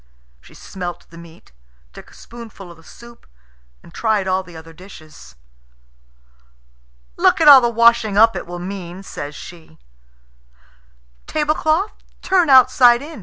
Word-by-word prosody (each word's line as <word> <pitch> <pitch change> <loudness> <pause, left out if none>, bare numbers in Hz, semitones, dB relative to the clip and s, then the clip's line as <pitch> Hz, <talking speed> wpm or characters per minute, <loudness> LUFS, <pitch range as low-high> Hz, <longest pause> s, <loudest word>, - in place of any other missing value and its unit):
She - - -20
smelt 180 -2 -9
the 165 - -15
meat, 170 0 -18 0.4
took - - -15
a - - -20
spoonful 225 -6 -13
of 170 - -16
the 165 - -21
soup, 235 +7 -17 0.6
and - - -18
tried 215 -4 -2
all 185 0 -1
the 175 -3 -14
other 165 0 -14
dishes. 160 - -16 1.8
"Look - - +2
at 320 - +2
all 275 -3 +9
the 240 - 0
washing 235 -2 +2
up 225 +1 +4
it - - -7
will 175 0 -8
mean," 180 0 -9
says 145 -5 -9
she. 160 - -14 1.5
"Tablecloth, 310 +5 -1 0.3
turn 365 -4 +1
outside 255 -1 +4
in!" 310 -2 -11
205 Hz, 140 wpm, -18 LUFS, 175-245 Hz, 1.8 s, all